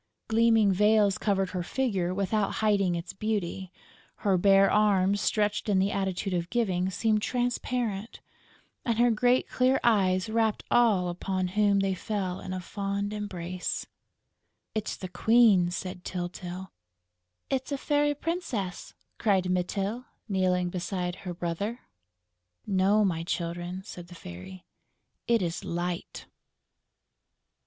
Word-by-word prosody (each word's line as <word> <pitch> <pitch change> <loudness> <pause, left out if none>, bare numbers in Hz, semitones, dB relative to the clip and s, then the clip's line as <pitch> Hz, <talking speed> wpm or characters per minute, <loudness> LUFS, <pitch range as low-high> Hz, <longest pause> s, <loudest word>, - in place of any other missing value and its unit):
Gleaming 225 -2 +4
veils 210 0 +3
covered 195 -3 0
her 180 - -2
figure 190 -4 -1
without 200 +2 0
hiding 200 -5 +2
its 170 +1 -5
beauty; 190 -3 -3 0.5
her 195 -2 +4
bare 195 +1 +5
arms, 200 -1 +3
stretched 210 0 0
in 200 - +3
the 195 +1 +2
attitude 190 0 -2
of 175 -1 -1
giving, 190 -6 0
seemed 215 +2 +1
transparent; 245 -3 -2 0.6
and 230 -2 0
her 240 0 +4
great 245 +3 +2
clear 255 +1 +2
eyes 190 -5 +3
wrapped 220 -1 0
all 215 -7 +4
upon 185 +1 -2
whom 200 0 +3
they 195 -1 +1
fell 185 -1 -3
in 185 - -7
a 185 - -3
fond 200 +2 -3
embrace. 185 -4 -4 0.9
"It's 215 -1 -2
the 185 - -6
Queen!" 215 -3 +4
said 180 0 -5
Tyltyl. 180 +1 -5 0.8
"It's 265 +1 -1
a 280 - 0
Fairy 290 +1 +1
Princess!" 270 - -4 0.2
cried 190 -4 +2
Mytyl, 195 +6 -1 0.2
kneeling 185 -3 +1
beside 180 0 -3
her 180 -2 -6
brother. 190 +8 -3 0.8
"No, 200 +2 +3
my 165 -4 0
Children," 175 +2 -4
said 175 -3 -9
the 175 - -12
Fairy. 165 - -10 0.6
"It 230 -4 +3
is 170 0 -3
Light!" 175 0 -4
195 Hz, 130 wpm, -28 LUFS, 180-215 Hz, 0.9 s, bare